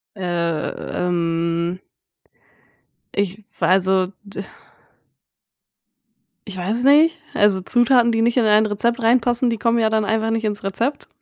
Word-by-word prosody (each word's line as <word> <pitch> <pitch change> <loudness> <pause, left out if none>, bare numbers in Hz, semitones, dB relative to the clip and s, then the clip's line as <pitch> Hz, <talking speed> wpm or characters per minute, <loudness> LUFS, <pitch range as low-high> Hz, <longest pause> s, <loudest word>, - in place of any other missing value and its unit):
Ähm. 170 0 -2 1.3
Ich 200 +1 -2
v - - -21
also, 190 0 +2 0.2
d 200 -1 -7 2.1
Ich 195 -2 -7
weiß 200 +6 -2
es - - -3
nicht, 320 +4 +4
also, 205 -2 +3
Zutaten, 240 +2 +3
die 225 -1 0
nicht 235 +2 +1
in 245 - +3
ein 215 0 +4
Rezept 235 +4 -1
reinpassen, 240 +1 +2
die 230 -2 -1
kommen 230 +1 +1
ja 220 -1 +2
dann 220 -1 +1
einfach 220 +1 -1
nicht 225 0 -2
ins 210 -2 -3
Rezept. 235 +9 -3
215 Hz, 135 wpm, -20 LUFS, 185-235 Hz, 2.1 s, nicht